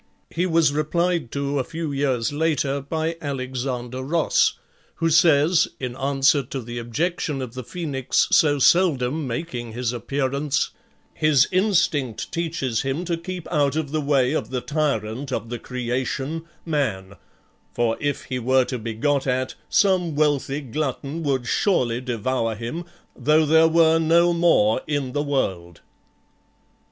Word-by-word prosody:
He 175 +3 0
was 165 -4 +3
replied 165 -1 0
to 140 0 -1
a - - +1
few 160 +3 -5
years 135 -3 0
later 145 -2 0
by 160 +3 -2
Alexander 130 -2 -4
Ross, 160 +5 +2 0.4
who 165 0 0
says, 160 +1 +4
in 125 -2 -4
answer 135 +1 +2
to 135 +1 -6
the 120 0 -6
objection 150 +5 -2
of 125 -3 -5
the 130 0 -6
Phoenix 140 -3 -1
so 145 -2 +4
seldom 145 -1 +2
making 120 -4 -5
his 120 0 -2
appearance, 140 +3 -1 0.4
"His 155 -5 +3
instinct 170 - +1
teaches 155 -9 -2
him 135 +6 -2
to 170 -1 0
keep 175 +1 -7
out 145 -1 +2
of 155 -3 -2
the 155 0 0
way 140 -2 +2
of - - -2
the 125 -1 -2
tyrant 135 -4 -2
of 115 -2 -3
the 120 -1 -4
creation, 130 +6 -3 0.2
MAN, 110 - -2 0.6
for 115 -1 0
if 145 -1 -2
he 125 -1 -4
were 130 +1 +3
to 125 -1 -4
be 110 0 -5
got 140 +4 0
at, 130 0 0 0.2
some 185 -6 +2
wealthy 145 -1 +1
glutton 140 +3 -3
would 135 -5 -1
surely 125 - +1
devour 120 -1 -1
him, 120 +11 -5 0.3
though 155 +5 +3
there 160 +2 +5
were 165 0 +4
no 170 +2 +4
more 165 -10 +3
in 145 -4 -1
the 145 - -1
world." 95 - -2
140 Hz, 145 wpm, -23 LUFS, 125-160 Hz, 0.6 s, there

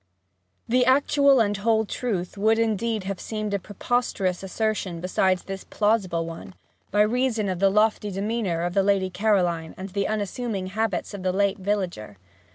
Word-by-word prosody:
The 250 +2 +3
actual 275 +1 +4
and 205 -2 +2
whole 220 +2 +2
truth 200 -6 -3
would 220 +2 +3
indeed 225 -1 0
have 195 0 -4
seemed 215 -2 -4
a 200 - +1
preposterous 200 -3 -1
assertion 195 -3 -2
beside 185 +1 +1
this 195 -1 -6
plausible 195 -6 0
one, 165 +3 -9 0.3
by 205 +1 +2
reason 230 -1 +1
of 185 -2 -2
the 195 0 +4
lofty 210 +1 +2
demeanour 195 -3 -1
of 175 0 -2
the 195 - +3
Lady 195 -1 +1
Caroline 180 -5 0
and 190 +1 -6
the 200 +1 -1
unassuming 215 -1 -2
habits 220 -3 -1
of 200 - -6
the 185 0 0
late 200 +1 +1
villager. 185 - -3
200 Hz, 165 wpm, -25 LUFS, 185-220 Hz, 0.3 s, actual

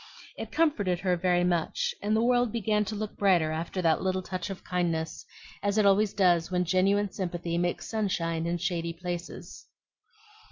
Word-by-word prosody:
It - - -7
comforted 205 - +1
her 180 -2 +2
very 175 0 +2
much, 175 -2 0
and 210 +1 +1
the 220 - +2
world 245 -1 +3
began 210 -1 +1
to 215 - -4
look 215 0 -4
brighter 180 -6 +3
after 165 +3 -3
that 160 -1 +3
little 185 0 -1
touch 185 +2 -4
of 195 - -7
kindness, 170 -3 -2 0.3
as 205 +1 0
it 215 - +4
always 200 +1 +4
does 175 -3 +3
when 180 -1 0
genuine 195 +3 +2
sympathy 175 -3 -3
makes 175 0 -1
sunshine 170 -6 -1
in 175 +1 0
shady 170 -1 -2
places. 175 0 -7
185 Hz, 170 wpm, -28 LUFS, 175-205 Hz, 0.3 s, it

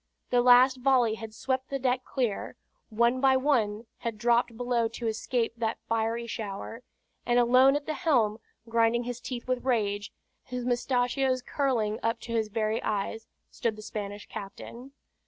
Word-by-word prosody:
The 245 -1 +4
last 250 +2 +6
volley 250 -3 +3
had 225 0 -7
swept 260 +4 -2
the 275 - -1
deck 255 -1 0
clear; 245 -7 -2 0.3
one 235 +3 +2
by 265 -1 +5
one 235 -6 +1
had 230 -2 -4
dropped 235 0 +2
below 245 -1 +1
to 230 +1 -7
escape 225 +1 -1
that 225 -1 -1
fiery 230 +1 0
shower: 220 +1 -6 0.4
and 240 0 +1
alone 255 +3 +5
at 290 0 -2
the 310 - -2
helm, 245 - +1 0.3
grinding 230 +1 +2
his 245 0 -5
teeth 250 -2 -6
with 255 -1 -1
rage, 210 -5 0 0.3
his 250 -1 -5
mustachios 250 +1 +1
curling 230 -7 0
up 230 +1 0
to 240 - -8
his 220 -2 +1
very 215 +1 -1
eyes, 215 +2 -3 0.2
stood 230 -2 -2
the 215 - -10
Spanish 205 -1 -6
captain. 235 +6 -9
235 Hz, 160 wpm, -28 LUFS, 220-255 Hz, 0.4 s, last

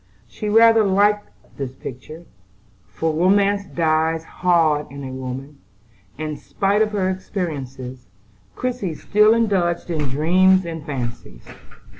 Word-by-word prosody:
She 210 - -5
rather 225 +1 +6
liked 205 +1 +2 0.3
this 130 -2 -5
picture; 155 +7 -9 0.6
for 160 -1 -2
romance 200 +4 +2
dies 160 -1 0
hard 165 -4 +1
in 140 +1 -9
a 130 - -6
woman, 130 +2 -7 0.6
and, 155 0 -5
spite 200 +2 0
of 215 -1 +1
her 195 -3 0
experiences, 135 - -5 0.5
Christie 245 -10 -3
still 210 +6 +3
indulged 185 -7 0
in 150 -4 -1
dreams 185 +7 +3
and 165 -2 -6
fancies. 120 - -6
165 Hz, 120 wpm, -21 LUFS, 140-200 Hz, 0.6 s, rather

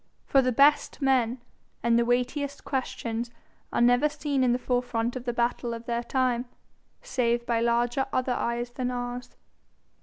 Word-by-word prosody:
For 270 - +4
the 255 -1 +1
best 285 +4 +4
men 255 -3 +2 0.4
and 235 0 +3
the 235 - +2
weightiest 250 +4 -1
questions 240 -3 -3 0.4
are - - 0
never 245 +5 +5
seen 285 -2 -1
in 250 - +3
the 245 - +2
forefront 245 -1 -1
of 255 -1 -6
the 240 - 0
battle 235 0 -1
of 230 0 -9
their 235 0 -1
time, 250 -1 0 0.6
save 240 - 0
by 235 -1 +1
"larger 240 +3 +1
other 255 0 0
eyes 240 0 -2
than 250 0 -2
ours." 245 0 -5
245 Hz, 160 wpm, -27 LUFS, 235-260 Hz, 0.6 s, never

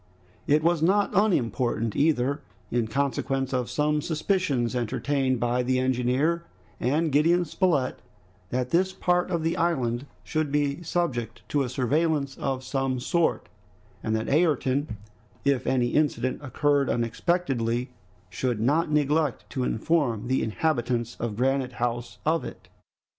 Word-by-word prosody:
It 150 +2 +3
was 170 -1 +2
not 195 +5 +3
unimportant 125 - +1
either, 140 -1 +2 0.3
in 120 -2 +1
consequence 135 +1 -1
of 125 -2 -1
some 150 0 +1
suspicions 155 - 0
entertained 130 +2 0
by 120 +1 +1
the 130 +1 +1
engineer 130 +6 +1 0.4
and 150 +6 +1
Gideon 165 +5 +3
Spilett, 155 -6 0 0.5
that 125 +2 -2
this 185 +2 +2
part 180 -1 +1
of 170 -3 -1
the 165 +1 0
island 130 -6 0 0.2
should 155 -2 -1
be 145 +1 0
subject 120 -11 -2
to 145 - +1
a 130 - -1
surveillance 140 +2 0
of 135 -1 -2
some 130 -1 -1
sort, 165 +6 0 0.5
and 110 -1 -1
that 110 0 -2
Ayrton, 145 -5 +1 0.5
if 140 -2 +1
any 125 -2 +2
incident 130 -3 0
occurred 145 0 +1
unexpectedly, 120 -1 0 0.4
should 125 -4 -1
not 150 +9 +2
neglect 150 -1 +1
to 130 - -2
inform 120 -3 0
the 130 - +2
inhabitants 120 -1 -1
of 115 -3 -3
Granite 130 0 +1
House 120 0 -3
of 160 +2 +2
it. - - -9
135 Hz, 135 wpm, -26 LUFS, 125-155 Hz, 0.5 s, It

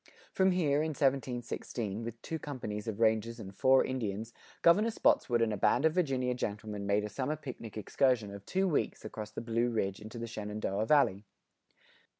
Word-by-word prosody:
From 190 0 +4
here, 150 -5 +2
in 160 - 0
1716, 120 -5 -1
with 115 0 -6
two 160 - -4
companies 120 -8 -5
of 110 -1 -3
rangers 115 +1 +2
and 100 -3 -8
four 130 +4 +5
Indians, 115 -3 -3 0.3
Governor 200 +7 +5
Spotswood 120 - +3
and 110 -1 +1
a - - -2
band 125 +8 +3
of 160 - +4
Virginia 135 -8 +1
gentlemen 105 -3 -4
made 100 +1 +2
a - - -2
summer 130 +8 -2
picnic 125 -7 -8
excursion 115 -1 +1
of 100 -1 -9
two 190 +1 +1
weeks 155 - -1
across 105 -1 -6
the 105 - -6
Blue 115 +1 0
Ridge 100 -4 -1
into 110 +3 -9
the 115 - -4
Shenandoah 105 -2 -3
Valley. 105 -10 +4
115 Hz, 175 wpm, -32 LUFS, 105-135 Hz, 0.3 s, four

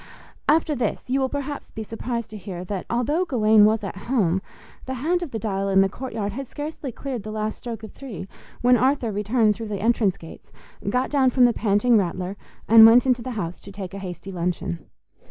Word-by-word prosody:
After 310 0 +3
this, 250 -1 -2
you 270 - +2
will 265 -1 +1
perhaps 285 +1 -5
be 220 - -6
surprised 230 +1 -4
to 215 - -7
hear 185 -2 -7
that 190 0 -4
although 270 +9 +1
Gawaine 220 - +5
was 215 0 +2
at 195 - -5
home, 190 -8 +2 0.5
the 260 - -3
hand 330 +8 0
of 345 - -4
the 230 - -4
dial 195 -2 -2
in 195 0 +5
the 195 - +3
courtyard 220 -3 -4
had 265 +5 -6
scarcely 295 -1 -6
cleared 255 -1 -5
the 215 - -8
last 215 0 -3
stroke 230 -3 -6
of 220 - -8
three 225 -9 -8 0.3
when 245 0 +5
Arthur 255 -1 +1
returned 210 +2 +2
through 225 +1 -6
the 210 -1 -3
entrance 220 -4 +2
gates, 165 - -13 0.4
got 250 +4 0
down 270 -3 +4
from 250 0 +4
the 240 - +4
panting 220 +2 +3
Rattler, 185 +1 -3 0.3
and 225 0 +9
went 230 +3 +8
into 250 -2 +2
the 255 - -5
house 175 -3 -4
to 200 - -11
take 195 -1 -7
a 200 - -6
hasty 190 0 -7
luncheon. 170 - -3
225 Hz, 210 wpm, -24 LUFS, 200-255 Hz, 0.5 s, and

